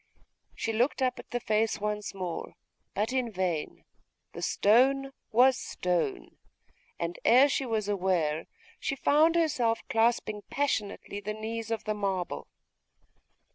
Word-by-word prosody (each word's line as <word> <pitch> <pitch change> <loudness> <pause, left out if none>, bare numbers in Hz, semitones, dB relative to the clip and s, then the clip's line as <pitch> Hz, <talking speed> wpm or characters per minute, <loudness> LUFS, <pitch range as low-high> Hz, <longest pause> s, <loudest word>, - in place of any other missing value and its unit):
She 225 - -2
looked 245 +4 +1
up 250 -1 0
at - - -11
the 245 - -2
face 220 -1 +1
once 210 -1 -3
more: 180 -3 -5 0.4
but 215 +5 0
in 255 -3 0
vain 180 -5 -2 0.5
the - - -7
stone 270 +6 +3 0.2
was 250 +3 +5
stone; 250 - -2 0.6
and 170 0 -4
ere 255 +4 +7
she 275 -1 -1
was 220 -3 -1
aware, 180 -6 0 0.3
she 275 - -2
found 310 +4 +4
herself 250 -9 +1
clasping 225 -2 +1
passionately 215 -7 -2
the 210 +1 -4
knees 225 +1 -5
of 225 -1 -2
the 215 - -1
marble. 195 -4 -2
220 Hz, 135 wpm, -29 LUFS, 200-255 Hz, 0.6 s, ere